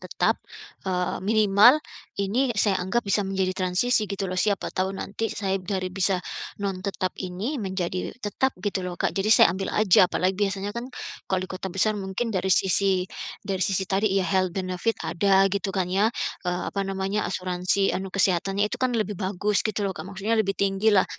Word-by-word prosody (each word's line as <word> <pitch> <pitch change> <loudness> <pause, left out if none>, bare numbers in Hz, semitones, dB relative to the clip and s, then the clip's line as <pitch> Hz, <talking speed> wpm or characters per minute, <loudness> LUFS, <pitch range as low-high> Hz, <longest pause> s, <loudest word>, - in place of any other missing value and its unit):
tetap, - - 0 0.5
eee, 180 -1 -1
minimal 215 +4 +6 0.4
ini 210 +7 +1
saya 200 -2 +2
anggap 190 +7 0
bisa 200 +1 +1
menjadi 190 -1 0
transisi 195 +5 +1
gitu 200 0 -3
loh, 185 -1 -2
siapa 200 -2 0
tahu 185 0 0
nanti 225 +4 -3
saya 195 -2 -2
dari 185 -1 -3
bisa 190 0 +1 0.5
non 195 -2 -2
tetap 185 -1 -2
ini, 200 +10 -3
menjadi 185 -2 -3
tetap 255 +6 0
gitu 190 +1 -2
loh, 180 -1 -5
Kak. - - 0
Jadi 195 +2 -1
saya 220 - +7
ambil 190 +1 -3
aja, 190 -3 +5
apalagi 185 +2 +1
biasanya 200 0 -2
kan 235 +3 -5 0.4
kalau 185 -1 0
di - - -10
kota 190 +1 -4
besar 195 +4 +1
mungkin 205 +3 -3
dari 190 -1 0
sisi 190 0 +2 0.4
dari 195 -2 -2
sisi 190 +1 +1
tadi 195 +1 +1
ya, 195 - +2
health 185 -1 0
benefit 185 +4 -1
ada 195 +2 +3
gitu 200 -1 -1
kan 180 -1 0
ya, 200 +3 +3 0.4
eee, 180 0 -1
apa 200 - -1
namanya, 195 +2 -1
asuransi 185 +1 0
anu 190 0 -3
kesehatannya 195 +1 +1
itu - - -4
kan 255 -2 +1
lebih 215 -2 0
bagus, 200 +1 0
gitu 215 -1 -1
loh, 195 - -1
Kak. 185 - -8
Maksudnya 210 +3 0
lebih 195 -2 -1
tinggi 200 +2 +1
lah, 200 -3 +5
195 Hz, 185 wpm, -25 LUFS, 185-205 Hz, 0.5 s, saya